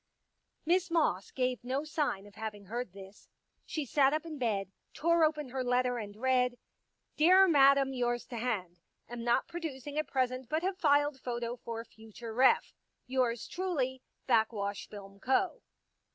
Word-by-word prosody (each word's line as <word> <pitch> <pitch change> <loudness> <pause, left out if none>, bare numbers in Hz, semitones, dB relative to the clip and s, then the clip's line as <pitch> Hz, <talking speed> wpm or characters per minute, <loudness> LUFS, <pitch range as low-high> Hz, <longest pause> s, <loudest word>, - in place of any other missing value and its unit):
Miss 360 +2 +2
Moss 305 - +1
gave 255 -2 -1
no 260 +4 -1
sign 300 - -2
of 205 - -15
having 210 -2 -6
heard 235 +1 -4
this. 195 +1 -13 0.4
She 310 -3 -3
sat 275 +2 +3
up 310 +1 -1
in 310 -3 -7
bed, 200 -6 -1 0.2
tore 335 +1 +3
open 305 -3 +1
her 260 +1 -2
letter 250 0 +1
and 205 -2 -7
read: 250 +1 +1 0.3
*' - - -50
Dear 370 +5 +7
Madam, 275 -3 +5
Yours 240 -1 -1
to 240 - -5
hand. 195 -7 -3 0.3
Am 240 -1 -6
not 240 0 +2
producing 295 -4 -5
at 310 - -2
present, 255 -2 -1
but 315 +2 0
have 375 0 -1
filed 285 -1 +3
photo 240 -1 -3
for 230 -1 -6
future 225 +1 -10
ref. 255 +3 +4 0.3
Yours 250 -3 0
truly, 280 -9 -2 0.3
Backwash 220 -4 +1
Film 200 -1 -11
Co." 265 - +1
255 Hz, 160 wpm, -31 LUFS, 230-295 Hz, 0.4 s, Dear